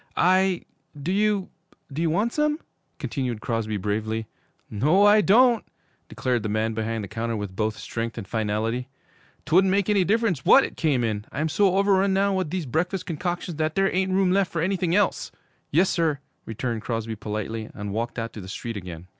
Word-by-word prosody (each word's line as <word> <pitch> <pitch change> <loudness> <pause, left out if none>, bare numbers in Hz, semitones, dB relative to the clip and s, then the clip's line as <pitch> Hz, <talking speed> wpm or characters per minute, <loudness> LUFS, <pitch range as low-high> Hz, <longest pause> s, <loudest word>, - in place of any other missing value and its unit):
'I 185 +1 +3 0.4
do 155 +6 -2
you 205 -1 +1 0.4
do 155 - -2
you 165 - +2
want 205 +9 +1
some?' 300 0 +1 0.4
continued 125 -6 -3
Crosby 110 -2 -2
bravely. 110 +3 -2 0.4
'No, 150 - +3
I 210 +1 +7
don't,' 235 +3 +5 0.5
declared 125 -2 -1
the 105 - -3
man 110 +1 0
behind 110 0 -2
the - - -5
counter 115 +3 -3
with 100 -3 -5
both 110 +2 -1
strength 115 0 -4
and 105 -5 -6
finality. 110 +3 -1 0.6
''Twouldn't 185 +5 +4
make 200 +1 +2
any 200 -2 +4
difference 205 - +1
what 270 - +7
it - - -5
came 145 -7 +1
in! 105 -2 -2
I'm 155 +3 -1
so 195 +3 +3
overrun 195 -1 +3
now 200 +1 +2
with 185 -4 -1
these 180 -1 -3
breakfast 175 +7 -1
concoctions 175 0 -3
that 155 0 -1
there 195 0 +2
ain't 190 0 +1
room 190 -1 +3
left 195 -1 +2
for 165 -1 -1
anything 185 -2 0
else!' 205 -2 +1 0.4
'Yes, 175 +6 +3
sir,' 160 -4 +1 0.3
returned 115 0 -3
Crosby 115 -1 -3
politely, 110 +1 -4
and 105 -1 -5
walked 115 +2 -3
out 115 -1 -4
to 105 - -7
the 95 - -9
street 115 +2 -5
again. 90 -3 -8
150 Hz, 190 wpm, -25 LUFS, -, 0.6 s, I